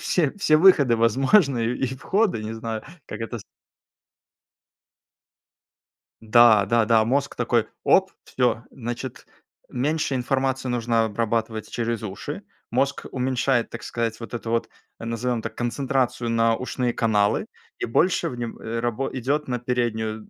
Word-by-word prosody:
все 155 -7 +1
все 155 -6 +4
выходы 150 -9 +5
возможные 125 - +3
и 135 - -1
входы, 190 - 0
не 110 - -4
знаю, 110 -1 -4 0.2
как - - -7
это 115 +1 -4
с - - -10 2.8
Да, 110 -2 +6
да 115 +2 +2
да. 110 0 +4
Мозг 140 +3 0
такой: 120 -2 +1 0.2
"Оп, 190 0 +4
всё". 125 -3 0
Значит, 120 +1 -6 0.4
меньше 140 +2 -1
информации 130 +1 -1
нужно 115 -2 +1
обрабатывать 110 0 -2
через 115 -1 -2
уши. 100 -3 -6 0.3
Мозг 140 +3 0
уменьшает, 130 -1 0
так 120 - -8
сказать, 115 -2 -3
вот 115 -1 -9
эту 115 -1 -4
вот, 115 0 0 0.3
назовем 115 +1 -2
так, 115 - -5
концентрацию 125 -1 -1
на 115 0 +3
ушные 125 0 -2
каналы, 105 -3 +1 0.3
и - - -2
больше 170 +7 +1
в 125 - -6
нём, 120 -1 -5
э, 115 +1 -4
рабо 120 +3 -2
идет 140 +4 -1
на 125 -2 -2
переднюю, 110 -3 -2
120 Hz, 140 wpm, -24 LUFS, 115-130 Hz, 2.8 s, Да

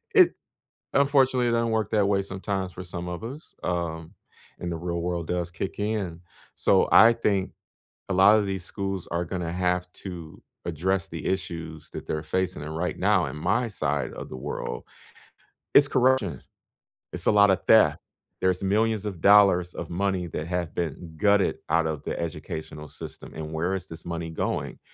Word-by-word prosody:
It - - +7 0.6
unfortunately, 135 -3 +3
it - - +2
doesn't 115 0 +1
work 110 -2 0
that 105 -3 +3
way 100 -1 +2
sometimes 95 -1 -3
for 90 - -7
some 90 0 -6
of 90 +3 -5
us, 135 +8 -8
um, 85 -1 -3 0.5
and 85 - -4
the - - -2
real 85 0 -3
world 85 -1 -2
does 90 -1 -2
kick 90 +3 -5
in. 105 -5 -2 0.3
So - - +3
I 115 +1 +8
think 100 -5 0 0.6
a - - 0
lot 95 +3 +7
of 105 - 0
these 95 -2 -3
schools 95 -2 -4
are 85 +1 -1
gonna 85 -1 -3
have 90 0 0
to 85 -4 -8 0.2
address 90 +3 0
the 85 -1 -7
issues 85 -4 -4
that - - -7
they're 75 0 -2
facing. 90 -1 -1
And 75 +1 -6
right 90 +2 -2
now, 95 -3 +3
in - - -5
my 95 +10 +1
side 75 -9 -1
of - - -8
the - - -7
world, 60 -1 -5 0.9
it's 145 - +8
corruption. 130 -8 +2 0.7
It's - - -2
a - - +6
lot 105 -1 +6
of 95 - 0
theft. 105 -10 +6 0.4
There's 95 0 +1
millions 105 +2 +1
of 95 -6 -5
dollars 100 -3 +6
of 85 - -6
money 95 0 -1
that 80 -1 -5
have 90 -2 -2
been 85 0 -4
gutted 100 +1 +3
out 80 +1 +3
of 75 -2 -4
the - - -3
educational 80 -1 -5
system. - - -9
And 80 -1 -6
where 85 +4 0
is 90 -2 -5
this 80 0 -9
money 85 -1 -4
going? 80 - -3
90 Hz, 180 wpm, -26 LUFS, 85-100 Hz, 0.9 s, I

